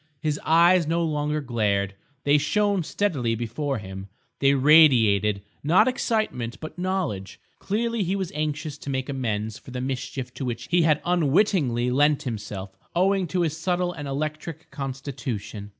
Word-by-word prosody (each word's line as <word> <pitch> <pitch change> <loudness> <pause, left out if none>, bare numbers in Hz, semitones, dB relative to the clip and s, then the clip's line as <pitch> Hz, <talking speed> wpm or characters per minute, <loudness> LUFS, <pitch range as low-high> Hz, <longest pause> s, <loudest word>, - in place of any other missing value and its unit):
His 150 0 -1
eyes 170 +1 +5
no 170 +1 +1
longer 150 -1 -1
glared; 105 -6 0 0.3
they 145 +1 +4
shone 200 +5 +1
steadily 150 - -1
before 120 +5 -2
him, 95 -1 -8 0.3
they 140 0 +4
radiated, 115 -9 +5 0.2
not 180 - +5
excitement, 215 - -1
but 155 +2 -8
knowledge. 180 - -2 0.2
Clearly 230 +3 -1
he 190 +1 0
was 190 -3 -3
anxious 150 -1 -3
to - - -7
make 130 0 -2
amends 110 -5 -2
for - - -14
the 125 0 -5
mischief 130 0 -4
to - - -6
which 120 0 -4
he 175 0 +4
had 155 -2 +2
unwittingly 155 - +2
lent 145 +2 +3
himself 100 -5 -5 0.2
owing 190 +1 +2
to 180 +2 -1
his 160 -3 0
subtle 175 +1 -1
and 145 -3 -6
electric 155 +3 -5
constitution. 125 -7 -5
145 Hz, 150 wpm, -25 LUFS, 120-170 Hz, 0.3 s, eyes